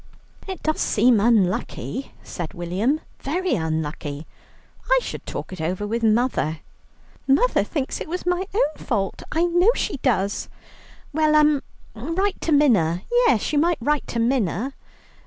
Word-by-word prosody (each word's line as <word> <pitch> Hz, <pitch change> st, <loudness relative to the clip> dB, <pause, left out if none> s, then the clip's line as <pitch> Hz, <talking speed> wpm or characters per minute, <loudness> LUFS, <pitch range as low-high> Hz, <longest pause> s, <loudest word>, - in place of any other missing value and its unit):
"It 380 Hz, -4 st, -6 dB
does 310 Hz, 0 st, 0 dB
seem 240 Hz, -3 st, +4 dB
unlucky," 220 Hz, +4 st, 0 dB
said 175 Hz, +2 st, -6 dB
William, 195 Hz, -, 0 dB, 0.2 s
"very 355 Hz, +4 st, -1 dB
unlucky. 155 Hz, -, -3 dB, 0.6 s
I -, -, +6 dB
should -, -, -7 dB
talk -, -, -5 dB
it 185 Hz, -, -7 dB
over 180 Hz, +5 st, -2 dB
with 230 Hz, +3 st, -2 dB
mother." 220 Hz, -9 st, +1 dB, 0.7 s
"Mother 285 Hz, -, +3 dB
thinks 280 Hz, -5 st, -3 dB
it -, -, -5 dB
was 360 Hz, +2 st, -4 dB
my 360 Hz, +1 st, 0 dB
own 310 Hz, -7 st, +1 dB
fault. 200 Hz, -6 st, -1 dB
I 325 Hz, +2 st, +1 dB
know 350 Hz, +4 st, +4 dB
she 380 Hz, -, -2 dB
does." 205 Hz, -7 st, 0 dB, 0.6 s
"Well 310 Hz, 0 st, +3 dB
um 300 Hz, -2 st, +4 dB, 0.3 s
write 330 Hz, -, -2 dB
to 330 Hz, -, -1 dB
Minna; 205 Hz, -, +3 dB
yes, 480 Hz, -, +3 dB
you 290 Hz, -, +3 dB
might 340 Hz, +2 st, +2 dB
write 295 Hz, +4 st, 0 dB
to -, -, -4 dB
Minna." 235 Hz, 0 st, 0 dB
255 Hz, 145 wpm, -23 LUFS, 195-315 Hz, 0.7 s, I